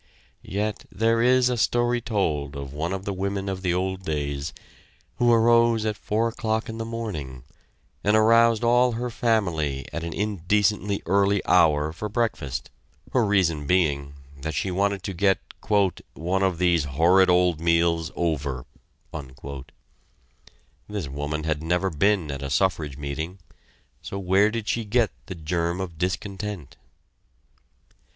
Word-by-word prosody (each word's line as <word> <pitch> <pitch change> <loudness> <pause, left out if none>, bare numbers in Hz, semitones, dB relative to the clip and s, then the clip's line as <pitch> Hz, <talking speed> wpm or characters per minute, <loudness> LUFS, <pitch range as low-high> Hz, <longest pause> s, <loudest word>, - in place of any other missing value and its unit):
Yet 105 +2 -3
there 115 +1 +2
is 125 +1 +4
a 125 -1 0
story 120 +1 +1
told 80 - -1
of 70 -1 -6
one 80 +4 -2
of 95 0 -4
the 100 - -2
women 100 +1 -3
of 95 -1 -3
the 90 -2 0
old 95 +1 -2
days, 70 -2 -3 0.7
who 120 0 +4
arose 115 -1 +4
at 105 -1 0
four 110 +2 0
o'clock 110 -1 -2
in 110 0 -6
the 115 - -3
morning, 90 - -5 0.6
and 105 +1 +3
aroused 115 +1 +5
all 120 +1 +4
her 120 +2 -3
family 90 - 0
at 85 - -3
an 85 - -4
indecently 105 +1 0
early 100 +2 +3
hour 80 -4 +3
for 105 +6 -5
breakfast, 105 - -2 0.4
her 125 - +3
reason 85 -8 +1
being 70 -6 +1 0.3
that 80 +1 -4
she 95 - -1
wanted 100 +1 0
to 100 - -4
get 95 +2 +3 0.8
"one 90 +4 -1
of 95 -3 +1
these 85 -3 +2
horrid 85 +7 +4
old 90 -2 +3
meals 85 -1 +2
over." 70 -7 -2 2.2
This 100 -7 -3
woman 75 +2 -3
had 80 -1 -1
never 90 +4 0
been 85 0 +1
at 70 -1 -6
a 70 - -4
suffrage 75 -3 0
meeting 75 +6 -4 0.6
so 100 - -6
where 100 +2 +3
did 115 -1 -4
she 115 - 0
get 110 +1 +1 0.2
the 95 - -6
germ 85 +2 -2
of 85 -4 -6
discontent? 95 - -4
95 Hz, 145 wpm, -25 LUFS, 80-110 Hz, 2.2 s, aroused